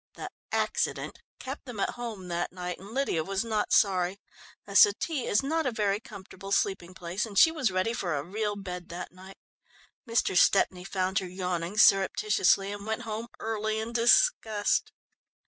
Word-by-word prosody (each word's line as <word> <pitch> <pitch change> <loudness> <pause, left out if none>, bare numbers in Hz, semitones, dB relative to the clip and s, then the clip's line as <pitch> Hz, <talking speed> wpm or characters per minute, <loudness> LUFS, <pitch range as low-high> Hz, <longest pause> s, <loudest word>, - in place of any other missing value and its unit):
The - - -7 0.2
"accident" - - -1 0.2
kept 270 +2 -7
them 245 -6 -8
at - - 0
home 225 -6 -7
that 175 0 -2
night, 180 -1 -5
and 195 +2 -12
Lydia 235 - -1
was 195 +5 -2
not 215 -2 -1
sorry. 190 -1 +2 0.5
A - - -9
settee 335 - +4
is 210 - +2
not 315 +1 0
a - - 0
very 210 -3 0
comfortable 195 -4 -11
sleeping 185 -3 0
place, 175 +3 -3
and 210 -3 -6
she 320 - +7
was 300 -9 0
ready 185 +5 0
for 180 -9 -2
a 140 - -2
real 210 +4 -3
bed 180 -3 -7
that 175 +1 -7
night. 190 +2 -14 0.7
Mr. 230 -4 +1
Stepney 180 -1 +3
found 190 -1 0
her 185 - -6
yawning 180 +1 -3
surreptitiously, 195 -1 +4
and 205 0 -7
went 220 +2 -2
home 225 +1 -5
early 220 -1 -2
in 225 +2 -5
disgust. 230 - +3
200 Hz, 170 wpm, -28 LUFS, 185-225 Hz, 0.7 s, she